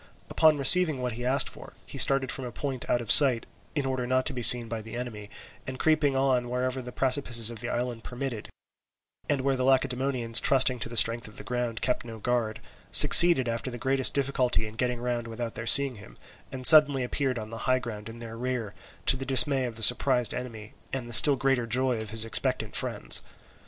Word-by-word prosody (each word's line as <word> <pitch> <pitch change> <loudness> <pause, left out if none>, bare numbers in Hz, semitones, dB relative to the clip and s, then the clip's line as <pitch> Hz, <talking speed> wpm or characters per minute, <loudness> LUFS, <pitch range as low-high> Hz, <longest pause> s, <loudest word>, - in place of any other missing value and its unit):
Upon 155 -1 +1
receiving 155 +1 +4
what 125 - -4
he 120 +2 -9
asked 130 +3 -1
for, - - -13
he - - -9
started 135 -1 +4
from 135 0 -8
a 120 - -9
point 135 0 -8
out 120 - -1
of 115 - -3
sight 130 -5 +6 0.3
in 145 -3 -3
order 130 -2 -5
not 130 0 -2
to - - -2
be 125 - -7
seen 120 0 +7
by 115 -1 -7
the 110 +1 -12
enemy, 110 -4 -9 0.4
and 130 0 -8
creeping 150 -2 -1
on 130 -2 -2
wherever 130 +1 -5
the 125 0 -11
precipices 120 -4 -1
of 115 - -11
the 120 - -8
island 120 -2 -6
permitted, 125 -3 -8 0.8
and 140 -2 -2
where 135 0 -2
the 130 - -4
Lacedaemonians, 130 -2 -2
trusting 130 -2 0
to 115 - -5
the 120 - -5
strength 115 +1 +2
of 105 - -16
the - - -10
ground, 120 -2 -6
kept 125 - -3
no 115 -1 -11
guard, 115 -1 -4 0.3
succeeded 170 -8 +9
after 115 +2 -5
the 120 - -9
greatest 130 +1 0
difficulty 130 -4 -2
in 110 - -11
getting 125 +1 -4
round 120 -1 -5
without 115 0 -8
their 115 - -9
seeing 140 -2 +3
him, - - -16 0.3
and 130 -1 -6
suddenly 145 -4 +5
appeared 130 0 -4
on 110 -1 -9
the 115 - -9
high 130 - +1
ground 115 -4 -9
in 115 - -13
their 115 -1 -11
rear, 125 -5 -6 0.3
to - - +3
the 135 - -8
dismay 135 0 0
of 120 -2 -8
the 110 - -2
surprised 125 -1 +2
enemy 115 -4 -10 0.2
and 130 -3 -7
the 120 - -11
still 140 +6 +6
greater 135 -2 -3
joy 125 -1 -3
of 110 - -10
his 110 +1 0
expectant 115 - -2
friends. - - 0
125 Hz, 215 wpm, -24 LUFS, 115-135 Hz, 0.8 s, succeeded